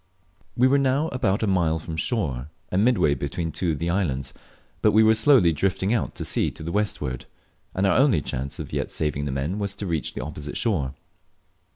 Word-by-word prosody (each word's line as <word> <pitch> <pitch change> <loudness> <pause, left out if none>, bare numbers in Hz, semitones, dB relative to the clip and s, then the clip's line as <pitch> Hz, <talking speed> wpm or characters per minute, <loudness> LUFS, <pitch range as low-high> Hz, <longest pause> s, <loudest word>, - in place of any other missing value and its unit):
We 125 +2 +5
were 140 +2 +4
now 140 +4 +1
about 110 -5 0
a - - +3
mile 85 -5 +2
from 80 +1 -6
shore, 75 - -2 0.2
and 95 +3 +2
midway 95 - +3
between 70 +5 -3
two 80 +1 -1
of - - -4
the 85 +4 -1
islands, 75 -8 -1 0.5
but - - +4
we 110 +1 +6
were 110 0 +6
slowly 110 - +5
drifting 95 +5 0
out, 115 - -1
to - - -4
sea - - +1
to - - -10
the 85 - -4
westward, 75 -11 -2 0.5
and 95 - +1
our 95 +4 +3
only 130 - +4
chance 70 +1 -4
of - - -7
yet - - -1
saving 75 -2 -2
the 70 - -2
men 70 +9 -2
was 100 -1 -2
to 100 - -5
reach 80 -7 -2
the - - -4
opposite 75 -1 -6
shore. 75 - 0
90 Hz, 210 wpm, -24 LUFS, 75-110 Hz, 0.5 s, we